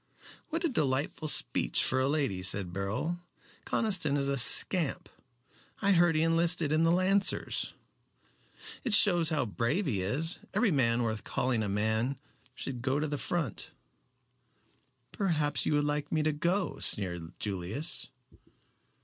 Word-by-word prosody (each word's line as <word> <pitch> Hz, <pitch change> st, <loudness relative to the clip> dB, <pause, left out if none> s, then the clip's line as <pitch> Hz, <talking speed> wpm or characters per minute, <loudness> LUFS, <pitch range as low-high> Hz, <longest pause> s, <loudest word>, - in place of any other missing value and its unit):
"What 330 Hz, +1 st, -3 dB
a -, -, +2 dB
delightful 150 Hz, -, -2 dB
speech 150 Hz, -, +2 dB
for 130 Hz, -, -1 dB
a 130 Hz, -, +1 dB
lady," 140 Hz, -10 st, -1 dB
said 95 Hz, -2 st, -1 dB
Beryl. 110 Hz, -, -3 dB, 0.5 s
"Conniston 180 Hz, -10 st, 0 dB
is 140 Hz, -1 st, -1 dB
a 140 Hz, -, 0 dB
scamp. 150 Hz, +5 st, +5 dB, 0.7 s
I 200 Hz, -, +1 dB
heard 175 Hz, -3 st, +3 dB
he 155 Hz, -, +2 dB
enlisted 165 Hz, -1 st, 0 dB
in 155 Hz, +1 st, +2 dB
the 165 Hz, -, +3 dB
Lancers." 190 Hz, +2 st, 0 dB, 1.1 s
"It 235 Hz, -5 st, +7 dB
shows 175 Hz, -6 st, +5 dB
how 150 Hz, -5 st, 0 dB
brave 125 Hz, -, -2 dB
he 105 Hz, -, -1 dB
is. 145 Hz, -, -3 dB, 0.2 s
Every 235 Hz, -5 st, +2 dB
man 120 Hz, -5 st, +1 dB
worth 110 Hz, -2 st, -3 dB
calling 125 Hz, -4 st, -1 dB
a 105 Hz, -, -3 dB
man 110 Hz, +6 st, -1 dB, 0.4 s
should 125 Hz, -2 st, -6 dB
go 135 Hz, +3 st, -1 dB
to 155 Hz, -, -2 dB
the 145 Hz, -1 st, -4 dB
front." 165 Hz, -, -4 dB, 1.4 s
"Perhaps 155 Hz, -7 st, 0 dB
you -, -, +1 dB
would 145 Hz, 0 st, +1 dB
like 145 Hz, 0 st, -3 dB
me 155 Hz, -1 st, 0 dB
to 155 Hz, -, +1 dB
go," 175 Hz, +6 st, -2 dB
sneered 85 Hz, -4 st, 0 dB
Julius. 105 Hz, -, -3 dB
145 Hz, 145 wpm, -29 LUFS, 115-170 Hz, 1.4 s, It